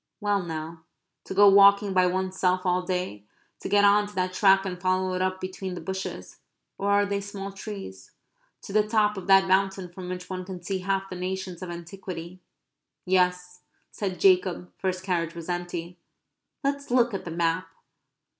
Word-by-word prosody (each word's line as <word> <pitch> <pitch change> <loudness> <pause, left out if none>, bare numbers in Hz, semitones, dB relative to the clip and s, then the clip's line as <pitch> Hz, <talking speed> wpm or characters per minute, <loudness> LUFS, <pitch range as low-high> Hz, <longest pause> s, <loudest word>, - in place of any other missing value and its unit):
Well 205 -2 +1
now, 160 -1 -6 0.4
to - - -6
go 205 +1 +7
walking 200 0 +6
by 185 -1 +4
oneself 185 0 0
all 180 0 +2
day 180 - -3 0.4
to - - -6
get 205 0 +5
on 205 +1 +4
to 205 - -13
that 185 0 -1
track 195 0 +4
and 180 -2 -5
follow 185 0 +1
it 185 - -1
up 185 0 -1
between 185 0 -5
the - - -5
bushes 190 0 -6 0.4
or 200 - 0
are 205 0 +4
they 200 0 -2
small 200 0 -6
trees? 195 - -8 0.5
to 195 - -8
the 215 - +5
top 210 -1 +2
of 190 -2 -7
that 195 0 +6
mountain 190 -1 +1
from 180 0 -7
which 180 0 -6
one 185 -1 -5
can 185 -1 -7
see 190 +1 -2
half 195 +1 -2
the - - -4
nations 185 -1 -4
of 185 - -6
antiquity 175 0 -8 0.7
"Yes," 180 -1 +1 0.3
said 190 -3 -4
Jacob, 185 -1 +2
for 190 - -4
his 185 0 -1
carriage 170 -3 -2
was 170 0 -8
empty, 175 0 -4 0.6
"let's 280 0 -2
look 245 -2 +3
at 195 - -3
the - - -6
map." 165 +1 0
185 Hz, 185 wpm, -26 LUFS, 180-195 Hz, 0.7 s, go